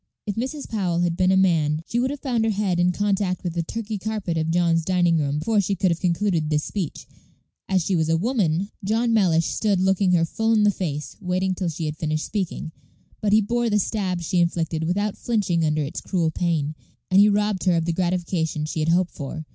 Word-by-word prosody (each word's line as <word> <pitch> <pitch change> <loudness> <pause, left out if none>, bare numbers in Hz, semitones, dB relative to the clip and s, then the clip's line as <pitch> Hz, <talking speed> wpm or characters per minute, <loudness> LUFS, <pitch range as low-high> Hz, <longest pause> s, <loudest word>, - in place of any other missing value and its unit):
If 205 - -2
Mrs. 260 +7 -4
Powell 180 -6 -1
had 175 -1 +1
been 185 +1 +2
a 190 - +4
man, 160 -5 +2
she 235 - -1
would 255 +2 +1
have 285 0 -5
found 245 -5 0
her 225 - +1
head 200 -4 0
in 175 +1 +3
contact 195 -1 -1
with 175 -3 -3
the 170 - -1
Turkey 215 +4 -4
carpet 210 -4 -3
of 160 0 -1
John's 170 -1 +2
dining 175 -2 +2
room 145 -1 -1
before 210 +6 +1
she 195 +1 -1
could 185 0 +1
have 170 - -1
concluded 175 -3 0
this 150 -1 +1
speech; 185 -8 -4 0.6
as 185 -3 +1
she 190 - +1
was 160 -1 +1
a 165 - +3
woman, 200 -3 0
John 225 +4 +1
Mellish 170 -7 +3
stood 205 -4 0
looking 190 0 +2
her 165 -1 +3
full 225 +7 0
in 215 -2 +4
the 205 - +5
face, 150 -6 -4
waiting 185 0 0
till 180 -1 -2
she 160 0 -4
had 155 0 -4
finished 155 0 -2
speaking. 185 -5 -3 0.5
But 210 - +1
he 215 +1 +5
bore 235 +3 0
the 210 - +2
stab 190 -3 -1
she 175 +2 0
inflicted 165 -2 0
without 205 +4 -1
flinching 200 -8 0
under 155 -1 +1
its 140 - -5
cruel 170 -4 0
pain, 155 -3 -1 0.4
and 190 - +6
he 205 +1 +7
robbed 205 -1 0
her 180 -2 +4
of 165 -1 0
the 170 - 0
gratification 170 -3 -1
she 155 - -4
had 155 +1 0
hoped 175 +1 +2
for. 155 +2 -6
180 Hz, 225 wpm, -23 LUFS, 165-205 Hz, 0.6 s, he